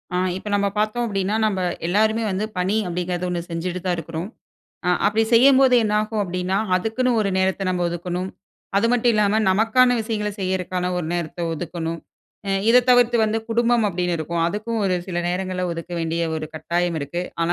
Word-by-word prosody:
அ - - +2 0.2
இப்ப 200 - -9
நம்ம 200 0 +1
பார்த்தோம் 215 +3 0
அப்டினா 200 -1 -1
நம்ம 200 -3 0 0.3
எல்லாருமே 220 +4 +2
வந்து 190 +3 -1
பணி 185 +3 +1
அப்படிங்கிறது 180 +1 -2
ஒண்ணு 175 -1 -1
செஞ்சுட்டு 175 +2 -3
தான் 180 -1 +1
இருக்கிறோம், 165 +2 -5 0.6
ஆ - - +2 0.2
அப்படி 215 +2 +2
செய்யும்போதே 260 +1 +6
என்னாகும் 215 +1 0
அப்டின்னா, 180 0 -2 0.2
அதுக்குன்னு 225 +7 0
ஒரு 200 -2 0
நேரத்தை 190 +1 0
நம்ம 180 -1 0
ஒதுக்கணும். 180 +2 -4 0.5
அது 205 +3 +3
மட்டும் 245 -1 +3
இல்லாம 210 0 +2
நமக்கான 225 +5 +4
விஷயங்களை 215 -2 -2
செய்யிறதுக்கான 185 -1 -1
ஒரு 175 -3 -2
நேரத்தை 175 0 -3
ஒதுக்கணும். 165 0 -4 0.5
அ - - 0 0.2
இதை 250 +2 +7
தவிர்த்து 245 -1 +5
வந்து 220 +1 0
குடும்பம் 235 0 +2
அப்படின்னு 180 -2 -1
இருக்கும், 165 +2 -2
அதுக்கும் 215 +5 -2
ஒரு 185 -2 +1
சில 175 -2 -2
நேரங்களில 185 0 -2
ஒதுக்க 165 +1 -7
வேண்டிய 165 +1 -1
ஒரு 155 - -4
கட்டாயம் 170 +2 -1
இருக்கு. 160 +6 -3 0.2
ஆனா, 170 +1 +1
190 Hz, 170 wpm, -22 LUFS, 175-215 Hz, 0.6 s, இதை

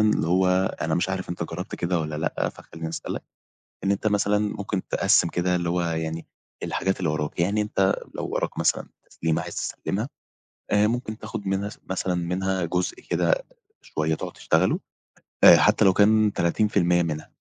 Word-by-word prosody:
اللي 105 -7 +3
هو 90 +2 +3 0.4
أنا - - 0
مش 90 - 0
عارف 95 -1 -3
أنت 85 - -3
جربت 90 +4 -6
كده 85 0 0
والّا 75 -1 -3
لأ، 80 - -1
فخليني 80 0 -8
أسألك، 80 - -5 0.6
إن 95 - +2
أنت 100 +2 0
مثلًا 105 0 +2
ممكن 100 -2 -2
تقسِّم 85 - +3
كده 90 +1 0
اللي 85 -1 -1
هو 90 0 +1
يعني 80 -1 -3 0.4
الحاجات 95 - -1
اللي 85 -5 0
وراك، 75 +1 -2
يعني 100 +5 +2
أنت 95 -2 +2 0.2
لو - - -3
وراك - - -2
مثلًا - - +1 0.2
تسليمة 80 -1 -1
عايز - - -7
تسلمها 105 +6 -3 0.6
آآ، 105 +1 +4
ممكن 115 -1 -2
تاخد 110 -1 -6
منها 95 +1 0
س - - -13
مثلًا 95 -1 -1
منها 90 +2 -1
جزء 90 +2 -1 0.2
كده - - +2 0.4
شوية 80 +1 -1
تقعد - - -6
تشتغله - - +1 0.6
آآ، - - +11
حتى - - +4
لو 95 - +6
كان 105 +1 +4
30% 85 -1 +2
منها 80 -2 -4
95 Hz, 170 wpm, -25 LUFS, 85-105 Hz, 0.6 s, آآ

